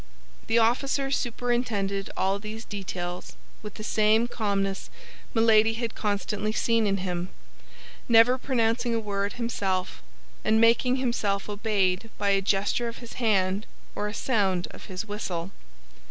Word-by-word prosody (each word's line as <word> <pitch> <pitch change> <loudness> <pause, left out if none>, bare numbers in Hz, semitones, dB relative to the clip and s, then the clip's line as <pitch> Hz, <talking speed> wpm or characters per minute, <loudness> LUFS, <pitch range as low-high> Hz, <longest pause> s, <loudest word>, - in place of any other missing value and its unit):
The 225 - +3
officer 270 +4 +2
superintended 235 -6 -1
all 195 +1 +1
these 220 +2 -7
details 180 -3 -5 0.3
with 210 -1 -8
the 215 - -7
same 215 +2 +3
calmness 200 -4 -2 0.5
Milady 225 -1 +5
had 230 -1 -3
constantly 210 0 -1
seen 230 0 +2
in 195 0 +1
him, 180 0 -2 0.8
never 235 +3 +6
pronouncing 235 -2 +1
a - - +1
word 200 -2 -2
himself, 195 - -2 0.4
and 220 0 +3
making 235 +2 +4
himself 225 -6 -1
obeyed 205 -1 0
by 205 -1 0
a 195 0 +3
gesture 200 +5 +1
of 230 - -6
his 235 -2 -10
hand 195 -2 +1 0.3
or 210 - -2
a 210 - -5
sound 195 -8 +1
of - - -12
his 185 +3 -5
whistle. 195 -4 -4
215 Hz, 140 wpm, -27 LUFS, 195-230 Hz, 0.8 s, never